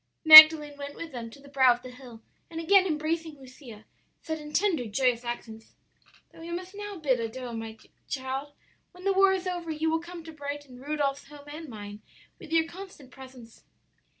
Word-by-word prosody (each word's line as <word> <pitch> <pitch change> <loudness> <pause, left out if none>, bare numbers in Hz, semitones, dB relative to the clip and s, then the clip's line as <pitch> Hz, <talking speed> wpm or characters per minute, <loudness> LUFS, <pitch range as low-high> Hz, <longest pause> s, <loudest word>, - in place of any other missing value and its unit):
"Magdalen 310 -2 +10
went 285 0 -8
with 330 -1 -9
them 235 -2 -8
to 255 - -16
the 280 - -17
brow 265 -3 +3
of 245 - -17
the 255 - -10
hill, 250 -3 -14 0.3
and 330 - -7
again 380 +3 +3
embracing 315 0 -3
Lucia, 255 -5 -14 0.4
said 315 0 -5
in 300 0 -11
tender, 340 -6 0
joyous 245 +2 0
accents, 225 -2 -8 0.6
'Though - - -18
we 330 +1 -10
must 360 +2 -7
now 410 -1 -8
bid 270 -6 0
adieu, 240 +2 -6
dear 225 -1 -7 0.3
child, 270 +2 -5 0.4
when 360 +1 -15
the 395 0 +1
war 390 0 +4
is 380 -1 -3
over 350 -2 -5
you 315 +1 -2
will 325 - 0
come 340 0 -11
to 325 - -11
brighten 285 -3 -8
Rudolph's 285 0 -3
home 290 0 -15
and 305 +1 -10
mine 205 -2 -10 0.4
with - - -13
your 325 0 +2
constant 340 -7 -13
presence.' 255 -4 -15
290 Hz, 190 wpm, -26 LUFS, 250-330 Hz, 0.6 s, Magdalen